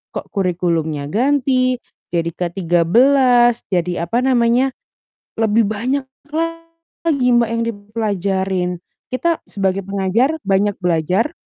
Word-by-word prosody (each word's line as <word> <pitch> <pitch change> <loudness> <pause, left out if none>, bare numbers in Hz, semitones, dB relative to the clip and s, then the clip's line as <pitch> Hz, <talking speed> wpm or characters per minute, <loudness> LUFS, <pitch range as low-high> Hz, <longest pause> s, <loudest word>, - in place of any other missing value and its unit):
kok, - - -6
kurikulumnya 170 -6 -1
ganti 255 +1 +2 0.4
jadi 170 -1 0
K13, 235 +9 +3
jadi 175 -1 0
apa 235 - +1
namanya" 250 +1 +3 0.7
lebih 220 +1 +3
banyak 255 +6 -1 1.0
lagi, 280 -7 +1
Mbak, 240 -2 +3
yang 230 0 0
dipelajarin. 200 -4 -2 0.4
Kita 330 +6 0
sebagai 195 -1 -1
pengajar 200 +9 +1
banyak 200 +1 +2
belajar, 180 - +1
210 Hz, 100 wpm, -18 LUFS, 180-250 Hz, 1.0 s, K13